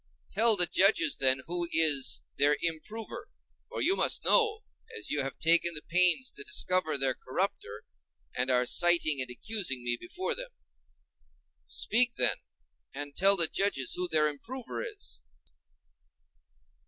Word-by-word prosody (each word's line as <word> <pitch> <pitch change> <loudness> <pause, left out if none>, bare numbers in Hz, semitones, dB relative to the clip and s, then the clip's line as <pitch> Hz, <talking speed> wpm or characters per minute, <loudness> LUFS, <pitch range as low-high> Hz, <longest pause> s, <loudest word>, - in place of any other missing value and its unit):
Tell 225 +2 +3
the 180 -3 +6
judges, 220 - +2
then, 130 0 +3
who 175 0 -2
is 140 -7 +4
their 145 +1 +1
improver; 190 +7 -6 0.4
for - - -4
you 375 +4 +2
must - - 0
know, 440 -2 +2 0.4
as - - -6
you 150 - 0
have 135 -1 -6
taken 170 +1 +2
the 150 - -5
pains 180 +8 +2
to 420 - -8
discover 185 - 0
their 135 -1 +1
corrupter, 130 - -6 0.5
and 125 +1 -2
are 125 -1 +1
citing 170 -2 +4
and 130 - -5
accusing 135 - -2
me 120 0 -1
before 360 - -5
them. - - -7 1.2
Speak, 240 +1 +2
then, - - +1 0.6
and 145 0 -7
tell 195 +2 +4
the 170 -3 +4
judges 175 -7 -1
who 180 0 -3
their 155 -2 +1
improver 230 - -8
is. 425 - -9
170 Hz, 140 wpm, -28 LUFS, 140-220 Hz, 1.2 s, the